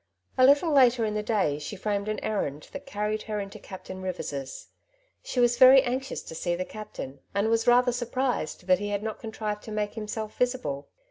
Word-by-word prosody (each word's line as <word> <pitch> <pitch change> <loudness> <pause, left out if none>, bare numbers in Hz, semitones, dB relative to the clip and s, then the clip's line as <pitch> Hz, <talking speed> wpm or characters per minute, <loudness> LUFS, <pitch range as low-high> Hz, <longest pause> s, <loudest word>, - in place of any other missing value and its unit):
A 255 0 +6
little 290 +4 +4
later 250 -5 +5
in 210 - -1
the 210 - -1
day 200 -10 0
she 150 +7 -6
framed 200 +1 -2
an 215 - -2
errand 150 -9 -3
that 280 0 -8
carried 210 -2 -2
her 210 -1 -1
into 195 -1 -7
Captain 190 0 -9
Rivers's. 145 -7 -5 0.5
She 255 - -3
was 240 0 +3
very 260 0 +9
anxious 260 +1 -3
to - - -9
see 175 +2 -1
the 185 +1 -3
captain, 140 -11 -8 0.2
and 200 +2 +2
was 230 +1 +1
rather 245 +1 +5
surprised 245 -7 -2
that 185 0 +4
he 205 0 -3
had 205 0 -2
not 220 -1 -4
contrived 215 -2 -4
to 220 - -7
make 210 -1 -2
himself 215 0 -5
visible. 245 - -1
215 Hz, 200 wpm, -27 LUFS, 195-245 Hz, 0.5 s, very